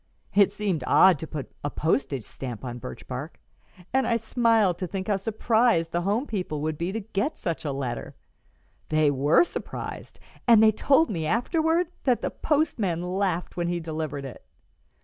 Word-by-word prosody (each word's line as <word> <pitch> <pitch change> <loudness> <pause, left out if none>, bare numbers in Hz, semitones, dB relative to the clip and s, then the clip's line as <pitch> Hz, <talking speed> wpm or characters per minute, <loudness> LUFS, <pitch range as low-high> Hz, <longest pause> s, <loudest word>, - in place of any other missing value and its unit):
It 200 -1 +5
seemed 200 -5 -2
odd 185 -5 +6
to 160 - -6
put 150 -4 -6
a 145 - -1
postage 140 -5 -1
stamp 125 +2 -7
on 120 0 -5
birch - - -9
bark, 130 +6 -6 0.5
and 265 0 +2
I 235 - +2
smiled 225 -4 +2
to 185 - -2
think 190 +1 -4
how 205 -2 +2
surprised 220 -3 +1
the 175 - 0
home 205 +8 0
people 180 - -3
would 155 +1 -1
be 170 +4 -2
to 225 +3 -3
get 210 +8 -2
such 170 -3 -3
a 145 - -1
letter. 130 -3 -4 0.7
They 155 -1 +3
were 145 - +4
surprised, 350 - -7 0.3
and 225 -2 +7
they 220 - +7
told 275 +5 +3
me 160 -5 -2
afterward 320 - +1 0.2
that 250 -3 +2
the - - -1
postman 225 - 0
laughed 180 -1 -1
when 175 -1 -1
he 175 0 -1
delivered 155 -4 -4
it." 130 - -9
180 Hz, 175 wpm, -26 LUFS, 155-225 Hz, 0.7 s, and